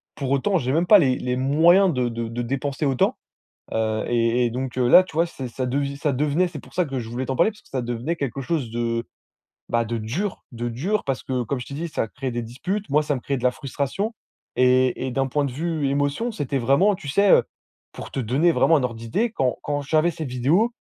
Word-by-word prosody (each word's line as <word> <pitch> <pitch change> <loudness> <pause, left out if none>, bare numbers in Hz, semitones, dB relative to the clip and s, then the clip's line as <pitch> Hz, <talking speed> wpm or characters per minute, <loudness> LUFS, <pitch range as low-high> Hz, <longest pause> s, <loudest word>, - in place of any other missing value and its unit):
pour 135 -2 -3
autant, 160 +9 +2
j'ai 130 -3 -1
même 170 +3 +2
pas 210 -2 +8
les 130 -5 +3
les 125 0 -2
moyens 170 +8 +4
de 125 -2 0
de 115 0 -4
de 115 +2 -4
dépenser 135 +4 -2
autant, 135 -2 +1 0.6
heu 110 -1 0
et 120 +1 +2
et 120 - +1
donc, 130 +1 -4
heu, 125 - +3
là, 185 - +9
tu 185 - -14
vois, 165 +2 +2
c'est 130 -6 -7
ça 130 +2 -3
devi 140 +2 -1
ça 145 0 0
devenait 150 +7 +1
c'est 160 -4 -8
pour - - -16
ça 180 -1 +1
que 135 -2 -4
je 115 - -6
voulais 125 +2 -4
t'en 130 - -1
parler, 220 - +3
parce 210 - -19
que - - -25
ça 130 -2 -2
devenait 120 +7 -2
quelque 140 -3 -3
chose 135 -5 -2
de, 115 0 -1 0.6
bah, 115 0 +1
de 115 +1 -3
dur. 155 - -3
De 120 0 -3
dur, 180 - -1
parce 135 -2 -2
que, 130 -1 -2
comme 130 +1 -3
je - - -7
t'ai 140 - -8
dit, 170 +4 -4
ça 130 -7 -2
crée 130 +3 -5
des 120 0 -3
disputes. 185 - -4
Moi, 150 +2 +3
ça 150 -1 -1
me - - -6
crée 140 +2 -2
de - - -10
la 125 - +5
frustration 140 - -3 0.4
et 130 0 +3
et 130 - -2
d'un 135 +1 0
point 145 +2 0
de 135 - -3
vue 155 0 -1
émotion, 145 - 0
c'était 140 - -2
vraiment, 140 - +3
tu 150 - -11
sais, 200 +8 +3
heu, - - +6 0.5
pour - - -9
te - - -4
donner 135 +9 +2
vraiment 165 - +4
un 145 - +1
ordre 120 -2 -2
d'idée, 115 - -1
quand 130 - 0
quand 145 0 -2
j'avais 155 +4 +2
cette 155 -1 -5
vidéo, 160 - +2
135 Hz, 250 wpm, -23 LUFS, 125-160 Hz, 0.6 s, là